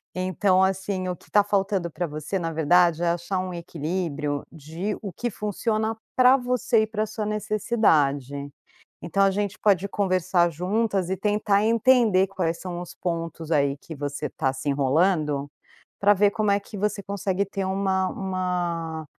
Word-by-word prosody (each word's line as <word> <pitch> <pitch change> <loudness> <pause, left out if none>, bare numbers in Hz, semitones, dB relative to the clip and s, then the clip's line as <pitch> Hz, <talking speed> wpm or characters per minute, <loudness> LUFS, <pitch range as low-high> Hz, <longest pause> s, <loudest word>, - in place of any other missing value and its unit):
Então, 185 +1 +2
assim, 190 -1 -1
o 180 - -3
que - - -22
tá 205 -1 +5
faltando 195 -4 0
pra 175 +2 -3
você, 155 +6 -4
na 165 -1 -3
verdade, 170 +1 +3
é - - +2
achar 175 +2 -1
um 185 -1 -4
equilíbrio 155 -3 -3
de 165 +6 -5
o 200 -3 -5
que 240 +7 -3
funciona 220 +1 -2 0.2
pra 255 +1 +6
você 245 -3 +1
e - - -2
pra 215 0 -1
sua 215 0 -4
necessidade. 160 - +1 0.5
Então, 195 +3 0
a 195 - +5
gente 205 0 -2
pode 200 -2 +3
conversar 185 -3 +1
juntas 190 +3 -1
e 190 - -1
tentar 205 0 +1
entender 225 -4 +4
quais 175 -4 -2
são 175 -1 -5
os 175 - -9
pontos, 165 -2 -3
aí, 140 -1 +2
que 160 - -9
você 145 +1 -4
tá 135 -3 -1
se 135 +2 -5
enrolando 145 +1 +1 0.5
pra 205 +1 +5
ver 205 +1 +4
como 210 -1 0
é 200 - +3
que 205 +1 -10
você 205 0 -1
consegue 195 -1 -1
ter 195 0 -4
uma 190 -1 0
uma 175 -4 -3
185 Hz, 165 wpm, -25 LUFS, 165-205 Hz, 0.5 s, pra